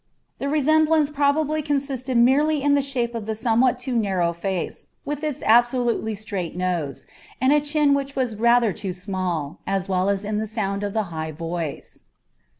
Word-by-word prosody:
The 280 - -2
resemblance 310 +1 +3
probably 295 +2 +1
consisted 275 -4 -1
merely 280 +5 +3
in 285 0 +3
the 285 - +4
shape 250 -4 -2
of 225 -2 -5
the 220 - -2
somewhat 240 +2 +2
too 250 0 -4
narrow 190 -6 +1
face, 180 +1 -4 0.2
with 295 +1 -4
its 300 -4 -3
absolutely 240 -1 +3
straight 195 -5 -5
nose, 175 -7 -2 0.3
and 260 +2 +4
a 295 - +4
chin 295 -1 +2
which 275 0 -2
was 250 -4 -1
rather 235 -1 +3
too 190 0 -4
small, 180 -5 -3
as 195 -1 -1
well 185 0 +1
as 200 0 -1
in 210 0 -1
the 220 - -2
sound 200 -2 -2
of 200 -1 -3
the 220 - +1
high 160 0 -4
voice. 165 -1 -5
235 Hz, 175 wpm, -23 LUFS, 195-280 Hz, 0.3 s, the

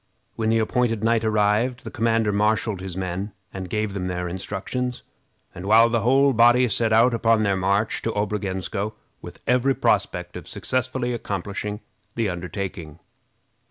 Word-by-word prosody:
When 110 -1 0
the 115 - +3
appointed 115 -1 0
night 115 0 +2
arrived, 110 +3 +1
the - - -7
commander 115 -2 +1
marshaled 105 -1 +1
his 95 -1 -6
men 95 +2 -3 0.2
and 95 -1 -6
gave 105 0 -1
them 95 -2 -3
their 90 -1 -3
instructions, 105 +7 -4 0.5
and 90 - -8
the 115 +3 +5
whole 135 +4 +4
body 120 +2 +5
set 110 +2 +1
out 115 +3 +5
upon 115 -1 +3
their 100 -2 +2
march 100 +3 0
to 115 - -1
Obrogensko 100 0 -2 0.3
with - - -11
every 125 +2 +2
prospect - - 0
of - - -8
successfully 125 0 -2
accomplishing 105 -1 -4 0.3
the 115 -3 0
undertaking. 90 -3 -5
110 Hz, 150 wpm, -23 LUFS, 95-115 Hz, 0.5 s, the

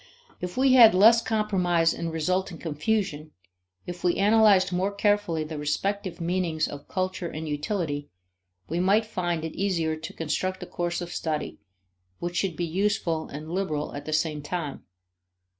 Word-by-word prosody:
If 180 +3 -5
we 260 0 +4
had 230 -6 +8
less 225 +5 +7
compromise 185 -7 +1
and 170 -1 -4
resulting 180 +3 -1
confusion, 155 -1 -2 0.5
if 175 0 -7
we 175 -1 +2
analyzed 205 -2 +5
more 185 +3 0
carefully 200 -5 +1
the 155 -1 -6
respective 190 +6 -2
meanings 170 -2 0
of 145 0 -9
culture 185 -1 -2
and 160 0 -6
utility, 145 -1 -2 0.6
we 170 - -2
might 200 +5 +3
find 175 -6 -2
it 160 - -5
easier 170 -5 0
to 155 +1 -8
construct 185 +4 -2
a - - -6
course 175 0 -3
of 175 0 -6
study 155 -2 -3 0.6
which 175 0 -4
should 190 -4 0
be 175 - -2
useful 170 -2 0
and 155 +3 -8
liberal 160 -5 -2
at 145 - -7
the 155 - -4
same 155 -1 0
time. 150 -1 -4
175 Hz, 160 wpm, -26 LUFS, 160-195 Hz, 0.6 s, had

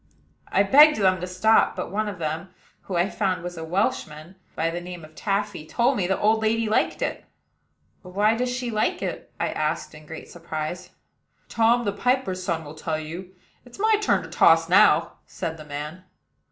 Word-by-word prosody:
I 195 - +4
begged 295 +9 +7
them 185 -3 +2
to 180 - -3
stop; 220 +5 +3
but 180 -1 -5
one 215 +2 -1
of 200 - -7
the 160 -2 -2
men, 160 +5 -5 0.4
who, 190 - -4
I 175 +2 +2
found, 190 -4 -1
was 175 0 -6
a 165 - -6
Welchman, 155 -1 -2 0.2
by 165 +1 0
the 175 +1 -4
name 175 -2 -8
of 155 - -17
Taffy, 200 -2 -2
told 240 - +1
me 185 -5 0
the 190 - +1
old 220 +1 +3
lady 225 +1 +1
liked 220 - +1
it. - - -3 0.8
"But 180 0 -13
why 210 +2 +3
does 250 +2 -1
she 250 -1 -3
like 215 -1 0
it?" - - -5
I - - 0
asked 155 +1 -2
in 155 0 -14
great 160 +1 -9
surprise. 170 +1 -6 0.6
"Tom, 230 +1 +2
the 200 - 0
piper's 225 -4 0
son, 170 -3 -2
will 145 - -9
tell 155 0 -3
you: 175 +4 -8 0.3
it's 245 -1 -15
my 435 +2 +3
turn 420 - +1
to - - -9
toss - - +5
now," - - +4
said 165 0 -5
the 155 - -11
man. 150 +5 -7
185 Hz, 200 wpm, -24 LUFS, 160-220 Hz, 0.8 s, begged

